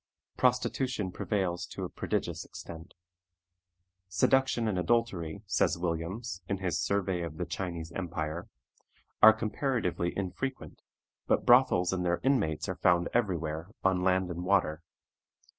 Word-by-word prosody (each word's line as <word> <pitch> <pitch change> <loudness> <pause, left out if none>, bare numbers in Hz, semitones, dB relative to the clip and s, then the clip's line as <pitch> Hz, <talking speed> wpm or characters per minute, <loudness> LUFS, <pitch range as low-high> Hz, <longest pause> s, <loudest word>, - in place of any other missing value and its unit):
Prostitution 125 -4 +1
prevails 90 -3 -2
to - - -6
a - - -3
prodigious - - -2
extent. 80 0 -10 1.1
"Seduction 120 +5 +2
and 95 -4 0
adultery," 100 -4 0
says 95 -3 +1
Williams, 90 +5 -3
in 100 - 0
his 90 -3 -1
Survey 95 -1 0
of 80 -2 -5
the - - -2
Chinese 85 -3 -5
Empire, 85 -2 -4 0.7
"are 110 - +11
comparatively 110 -5 -1
infrequent, 130 +8 -4 0.5
but - - +2
brothels 120 -8 +5
and 90 -1 -1
their 85 -1 +1
inmates 80 - +1
are 95 - -3
found 90 -1 +3
every 105 -7 +2
where, 80 +1 -4 0.2
on 95 -1 +2
land 95 0 +2
and 90 +1 -4
water. 90 -4 +2
90 Hz, 130 wpm, -30 LUFS, 85-110 Hz, 1.1 s, are